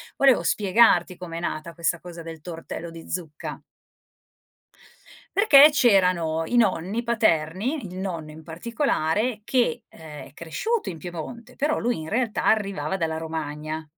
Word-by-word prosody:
volevo 265 -10 +4
spiegarti 185 -1 +3
com'è 170 -2 -6
nata 170 0 -4
questa 170 +1 -1
cosa 175 -1 -9
del 165 -1 -8
tortello 165 +1 -7
di 165 0 -11
zucca. 160 -4 -5 1.8
Perché 300 -8 +8
c'erano 180 - +3
i 245 - -3
nonni 200 -1 +1
paterni, 220 - 0
il 180 +1 -9
nonno 175 -5 -4
in 155 +1 -12
particolare, 215 - -1
che, 240 -8 +1
ehm, 155 -2 -11
è - - -18
cresciuto 435 - -2
in 165 -3 -7
Piemonte, 185 +9 -8
però 300 +2 0
lui 240 -8 -1
in 155 - -7
realtà 225 +3 -1
arrivava 200 -3 +1
dalla 160 -3 -1
Romagna 155 -1 -5
180 Hz, 135 wpm, -24 LUFS, 160-230 Hz, 1.8 s, Perché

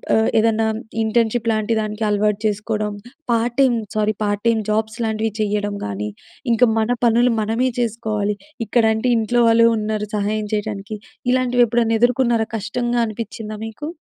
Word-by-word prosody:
ఆహ్, 220 0 +3
ఏదన్నా 225 0 +2 0.4
ఇంటర్న్‌షిప్ 230 +1 +1
లాంటి 215 +1 0
దానికి 215 +1 -4
అలవాటు 210 0 +1
చేసుకోవడం. 210 0 -1 0.4
Part 235 +1 0
time, 255 -3 +4 0.2
sorry 215 -1 +1
part 205 0 -1
time 225 -1 +3
jobs 220 +2 -1
లాంటివి 220 0 -1
చేయడం 205 -1 -1
కానీ 105 +1 -3 0.4
ఇంకా 240 +1 +4
మన 220 +2 0 0.2
పనులు 235 +1 +4
మనమే 225 +4 0
చేసుకోవాలి. 215 -3 -1 0.3
ఇక్కడ 230 +1 +2
అంటే 245 +3 0
ఇంట్లో 240 +2 +1
వాళ్ళు 230 0 +6
ఉన్నారు 210 0 -2
సహాయం 210 +1 -1
చేయడానికి. 210 0 -4 0.3
ఇలాంటివి 250 -1 +3
ఎప్పుడైనా 230 0 +1
ఎదుర్కొన్నారా? 240 -2 +2
కష్టంగా 240 +3 -1
అనిపిచ్చిందా 215 0 -6
మీకు? 225 +7 -7
220 Hz, 145 wpm, -20 LUFS, 210-235 Hz, 0.4 s, వాళ్ళు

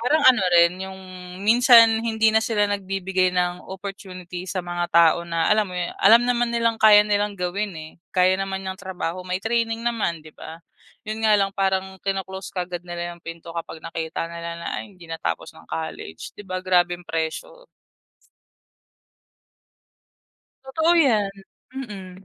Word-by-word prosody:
Parang 290 +7 +2
ano 255 -4 +5 0.2
rin 170 +1 +3
'yong, 190 0 -7 0.4
minsan 230 0 +6
hindi 220 -1 +2
na 220 - +4
sila 210 -3 +1
nagbibigay 195 -2 0
ng 180 0 -1
opportunity 185 -2 -8
sa 185 - -2
mga 175 0 -3
tao 170 0 +6
na, 165 -1 0
alam 210 -1 +2
mo - - -6
'yon, 175 -1 -2
alam 225 +4 +7
naman 240 -1 +1
nilang 230 -1 +1
kaya 215 -1 +8
nilang 205 0 0
gawin, 195 +3 -2
eh, 155 0 -9 0.2
kaya 185 0 +5
naman 195 0 -4
yang 190 0 -4
trabaho, 185 -2 -4
may 180 0 -2
training 225 +1 -1
naman, 220 -9 -1
'di 155 - -13
ba? 160 - -9 0.5
'Yon 215 +1 -4
nga 215 -1 +5
lang 195 -1 0
parang 190 -1 -1
kino-close 190 -1 -4
kaagad 180 -1 -4
nila 175 0 -5
'yong 170 - -15
pinto 165 0 -8
kapag 165 - -5
nakita 165 0 -4
nila 170 0 -6
na 170 - -8
"Ay, - - -10
hindi 175 - -14
natapos 165 0 -4
ng - - -16
college", 80 0 -6
'di 205 - -10
ba, 185 0 -3
grabeng 175 -1 +1
pressure? 170 - -4 3.0
Totoo 320 +5 +2
yan, 230 -12 +3 0.4
mm. 195 -7 -8
190 Hz, 160 wpm, -23 LUFS, 175-215 Hz, 3.0 s, kaya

